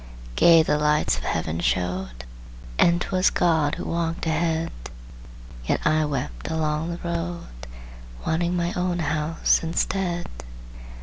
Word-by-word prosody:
Gay 165 Hz, -, +7 dB
the 150 Hz, -1 st, +1 dB
lights 150 Hz, -, +2 dB
of -, -, -10 dB
Heaven 80 Hz, 0 st, -2 dB
showed, 90 Hz, -9 st, -2 dB, 0.5 s
And 170 Hz, 0 st, +5 dB
'twas 185 Hz, +1 st, +2 dB
God 160 Hz, -4 st, +2 dB
who -, -, -6 dB
walked 165 Hz, 0 st, -2 dB
ahead; 160 Hz, 0 st, 0 dB, 1.0 s
Yet -, -, +1 dB
I 155 Hz, 0 st, +3 dB
wept 100 Hz, -, -4 dB
along 155 Hz, 0 st, -1 dB
the 170 Hz, 0 st, -5 dB
road, 170 Hz, 0 st, -3 dB, 0.8 s
Wanting 170 Hz, +2 st, 0 dB
my 175 Hz, +1 st, -1 dB
own 180 Hz, -2 st, -1 dB
house 155 Hz, 0 st, +1 dB
instead. 175 Hz, +1 st, -1 dB
160 Hz, 125 wpm, -24 LUFS, 150-170 Hz, 1.0 s, Gay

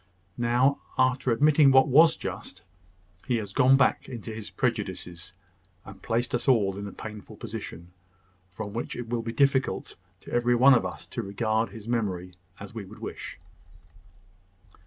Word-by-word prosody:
Now, 125 Hz, +4 st, +2 dB, 0.2 s
after 130 Hz, 0 st, +2 dB
admitting 145 Hz, +4 st, +5 dB
what 130 Hz, 0 st, +6 dB
was 160 Hz, +5 st, +6 dB
just, -, -, -7 dB, 0.6 s
he 125 Hz, -, +1 dB
has 105 Hz, -4 st, -4 dB
gone 130 Hz, +5 st, +5 dB
back 130 Hz, -, +2 dB
into 115 Hz, -3 st, -7 dB
his 110 Hz, -1 st, -7 dB
prejudices, 90 Hz, +1 st, -3 dB, 0.5 s
and 95 Hz, 0 st, -12 dB
placed 120 Hz, +2 st, -1 dB
us 120 Hz, +1 st, -1 dB
all 105 Hz, -7 st, +3 dB
in 100 Hz, +1 st, -6 dB
a -, -, -7 dB
painful 105 Hz, 0 st, -9 dB
position, 85 Hz, +2 st, -8 dB, 0.6 s
from 100 Hz, +2 st, -7 dB
which 115 Hz, -, -4 dB
it 120 Hz, -2 st, -6 dB
will 120 Hz, -1 st, -1 dB
be 115 Hz, 0 st, -4 dB
difficult 135 Hz, +1 st, +1 dB, 0.2 s
to -, -, -12 dB
every 120 Hz, 0 st, +3 dB
one 135 Hz, +3 st, +7 dB
of 125 Hz, -, +2 dB
us -, -, -9 dB
to 120 Hz, -, -5 dB
regard 110 Hz, +2 st, -1 dB
his 110 Hz, -1 st, -11 dB
memory 95 Hz, -7 st, -2 dB, 0.3 s
as 100 Hz, +2 st, -9 dB
we 115 Hz, -, -5 dB
should -, -, -12 dB
wish." -, -, -7 dB
115 Hz, 160 wpm, -27 LUFS, 100-130 Hz, 0.6 s, one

